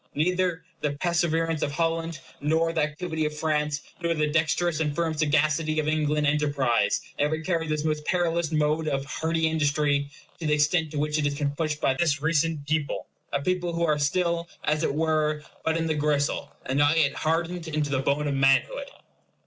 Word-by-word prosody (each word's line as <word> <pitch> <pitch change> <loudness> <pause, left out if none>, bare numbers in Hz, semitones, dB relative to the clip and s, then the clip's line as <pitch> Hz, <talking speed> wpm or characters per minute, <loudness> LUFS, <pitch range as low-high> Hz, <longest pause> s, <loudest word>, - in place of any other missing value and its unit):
Neither 180 +2 +1 0.2
the 150 -1 0
perseverance 165 0 0
of 145 - -1
Holland, 165 0 -1 0.2
nor 160 +3 +1
the 160 - +1
activity 155 +1 -2
of 150 0 -3
France, 150 -1 0 0.2
nor 170 0 +1
the 155 -1 +1
dexterous 160 +1 +1
and 150 -2 0
firm 165 -1 0
sagacity 155 +1 +1
of 155 - -1
English 150 -1 +1
enterprise 140 -8 +2 0.2
ever 150 +2 +1
carried 165 -2 -1
this 155 0 -1
most 150 -1 0
perilous 170 -2 0
mode 155 +1 +1
of 135 -2 -1
hardy 160 +3 -1
industry 145 -2 +1 0.3
to 165 - -3
the 150 - +3
extent 155 +2 +2
to 150 - -6
which 150 +1 0
it 150 - 0
has 145 -1 -1
been 145 -1 0
pushed 150 0 -2
by 135 - +2
this 145 0 +1
recent 155 -1 0
people; 155 -1 -1 0.3
a 140 0 -1
people 180 0 0
who 170 0 +1
are 150 -2 +1
still, 170 +3 0
as 155 0 +1
it 150 - 0
were, 155 -1 +1 0.2
but 160 0 +1
in 165 - -1
the 160 - +1
gristle, 150 -1 0
and 135 +2 0
not 145 +2 +4
yet 145 -3 +3
hardened 165 +2 -1
into 150 -2 -1
the 135 - +1
bone 140 +2 0
of 145 - 0
manhood. 135 - +2
155 Hz, 190 wpm, -26 LUFS, 150-165 Hz, 0.3 s, not